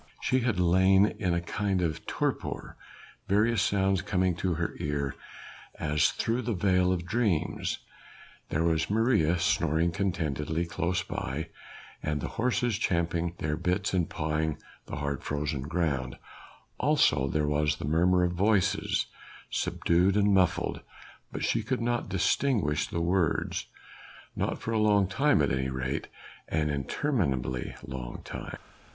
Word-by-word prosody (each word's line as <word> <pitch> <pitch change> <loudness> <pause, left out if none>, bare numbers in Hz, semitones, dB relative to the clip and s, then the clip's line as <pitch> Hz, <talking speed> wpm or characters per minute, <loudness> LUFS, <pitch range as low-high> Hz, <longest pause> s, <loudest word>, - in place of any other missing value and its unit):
She 130 - +1
had 120 -6 0
lain 95 +3 +4
in 90 -5 +1
a 85 - 0
kind 100 +2 -1
of 80 -4 -2
torpor, - - -2 0.5
various 105 +2 +3
sounds 95 -1 +2
coming 90 -2 +1
to 90 -2 0
her 85 +1 -2
ear 70 -2 -1 0.6
as 75 -1 +2
through 115 +2 -1
the 115 -2 -2
veil 90 0 +3
of 90 -2 -1
dreams: 105 -6 0 0.7
there 80 - 0
was 80 -1 +1
Maria 105 -7 +3
snoring 85 -1 +2
contentedly 80 -4 -1
close 85 +2 -1
by, 80 +2 -4 0.5
and 75 -1 -1
the - - -4
horses 120 -2 0
champing 85 -3 0
their 75 0 -1
bits 90 +5 -1
and 90 -3 +1
pawing 75 -1 -1 0.3
the - - -5
hard 70 -1 -3
frozen 75 -1 -2
ground, 70 -4 -1 0.6
also 135 - +3
there 75 +2 0
was 75 0 +1
the - - -6
murmur 90 +4 +3
of 90 - +1
voices, 100 +1 +1 0.5
subdued 90 +4 +2
and 105 -1 +4
muffled 95 -3 +2 0.5
but - - -4
she 115 - +1
could 125 +4 -2
not 120 -2 -1
distinguish 95 - +1
words. 85 0 0 0.7
Not - - -1
for 115 - -5
a 110 - +1
long 105 -2 +4
time 130 - +3
at 70 - +1
any 65 0 0
rate 65 +1 -3 0.4
an 75 -1 0
interminably 70 - -1
long 65 -3 -7
time! - - -6
85 Hz, 140 wpm, -29 LUFS, 75-100 Hz, 0.7 s, lain